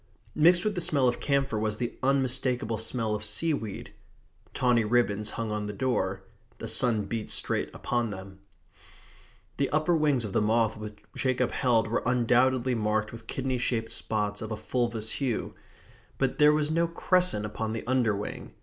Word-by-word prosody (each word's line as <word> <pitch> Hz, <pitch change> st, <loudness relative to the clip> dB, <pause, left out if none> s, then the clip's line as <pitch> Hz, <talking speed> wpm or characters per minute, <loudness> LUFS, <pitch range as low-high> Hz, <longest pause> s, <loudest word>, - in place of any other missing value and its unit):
Mixed 175 Hz, +4 st, +4 dB
with 210 Hz, -, +1 dB
the 180 Hz, -, -2 dB
smell 140 Hz, -5 st, +3 dB
of 120 Hz, -, 0 dB
camphor 140 Hz, -5 st, 0 dB
was 105 Hz, -1 st, -1 dB
the 120 Hz, 0 st, -3 dB
unmistakable 130 Hz, -3 st, 0 dB
smell 115 Hz, -1 st, -1 dB
of 105 Hz, 0 st, -3 dB
seaweed. 110 Hz, 0 st, -2 dB, 0.6 s
Tawny 125 Hz, -2 st, +2 dB
ribbons 105 Hz, -2 st, +1 dB
hung 115 Hz, -2 st, -2 dB
on 105 Hz, -1 st, -2 dB
the 105 Hz, -, -4 dB
door. 100 Hz, -5 st, -1 dB, 0.3 s
The -, -, -6 dB
sun 115 Hz, -4 st, +3 dB
beat 110 Hz, +1 st, -4 dB
straight -, -, 0 dB
upon 120 Hz, -2 st, -1 dB
them. 95 Hz, -1 st, -9 dB, 1.2 s
The 140 Hz, -, +1 dB
upper 155 Hz, +3 st, +2 dB
wings 145 Hz, -7 st, +2 dB
of 100 Hz, -, -6 dB
the -, -, +2 dB
moth 110 Hz, +1 st, +2 dB
which 105 Hz, 0 st, -8 dB, 0.2 s
Jacob 130 Hz, -1 st, 0 dB
held 115 Hz, -4 st, +2 dB
were 115 Hz, -, 0 dB
undoubtedly 125 Hz, +1 st, +2 dB
marked 110 Hz, -1 st, 0 dB
with 115 Hz, -1 st, -11 dB
kidney 130 Hz, -1 st, -2 dB
shaped 115 Hz, -2 st, -1 dB
spots 105 Hz, -2 st, -2 dB
of 110 Hz, 0 st, -5 dB
a 110 Hz, -, -2 dB
fulvous 115 Hz, -2 st, -2 dB
hue. 130 Hz, -6 st, -2 dB, 0.6 s
But 135 Hz, -1 st, -1 dB
there 150 Hz, 0 st, +7 dB
was 150 Hz, 0 st, +1 dB
no 170 Hz, +1 st, +2 dB
crescent 180 Hz, -, +1 dB
upon 110 Hz, +1 st, -3 dB
the 115 Hz, -, -5 dB
underwing. 115 Hz, -5 st, -1 dB
120 Hz, 170 wpm, -28 LUFS, 110-130 Hz, 1.2 s, there